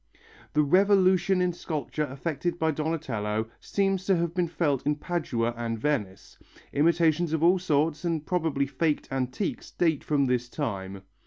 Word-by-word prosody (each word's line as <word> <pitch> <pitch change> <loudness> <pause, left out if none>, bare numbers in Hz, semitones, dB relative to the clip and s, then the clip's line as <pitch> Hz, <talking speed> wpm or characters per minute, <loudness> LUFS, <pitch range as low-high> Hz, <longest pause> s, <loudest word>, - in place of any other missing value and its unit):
The 150 - +4
revolution 185 +2 +4
in 180 -1 0
sculpture 150 -3 -3
effected 165 +5 -3
by 160 -1 +1
Donatello 125 -9 -2
seems 195 -2 0
to 195 - +3
be 175 +1 -1
felt 145 -5 0
in 150 +1 +1
Padua 145 -8 -2
and 115 -1 -3
Venice. 110 -7 -3 0.3
Imitations 165 +1 +2
of 160 0 0
all 180 +2 +5
sorts, 155 -2 0
and 165 -3 -1
probably 160 -6 0
faked 150 +2 -1
antiques, 135 +8 -3
date 160 -4 0
from 145 -2 +1
this 125 -1 0
time. 100 -9 -4
155 Hz, 145 wpm, -27 LUFS, 135-175 Hz, 0.3 s, all